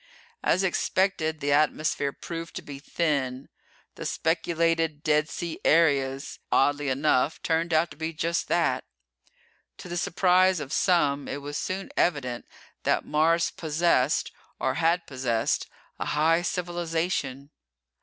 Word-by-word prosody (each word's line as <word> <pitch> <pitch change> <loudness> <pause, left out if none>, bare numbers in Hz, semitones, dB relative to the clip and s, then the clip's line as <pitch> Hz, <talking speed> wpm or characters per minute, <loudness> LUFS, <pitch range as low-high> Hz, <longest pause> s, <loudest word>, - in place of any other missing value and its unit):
As 185 - +2
expected 175 -4 0
the 145 - 0
atmosphere 150 -1 +1
proved 165 +2 -7
to - - -5
be 140 -1 -8
thin. 140 -4 -1 0.4
The - - -5
speculated 165 -2 0
dead 150 0 +2
sea 170 -2 -5
areas, 140 -4 +2
oddly 145 +1 +2
enough, 135 +1 +1
turned 165 +1 0
out 160 +1 +2
to - - -12
be 160 0 -3
just 170 +1 -1
that. - - +1 0.9
To 195 - -10
the 175 0 -4
surprise 185 +1 +3
of 145 -1 -6
some, 145 -6 +2
it 140 0 -5
was 145 +1 -6
soon 190 +4 -3
evident 125 -8 0 0.3
that - - +1
Mars 165 +3 +2
possessed, 155 -3 +1 0.3
or - - 0
had 165 +2 +1
possessed, 125 -4 -1 0.3
a - - -2
high 160 +3 +2
civilization. 170 -5 -2
160 Hz, 130 wpm, -26 LUFS, 145-170 Hz, 0.9 s, surprise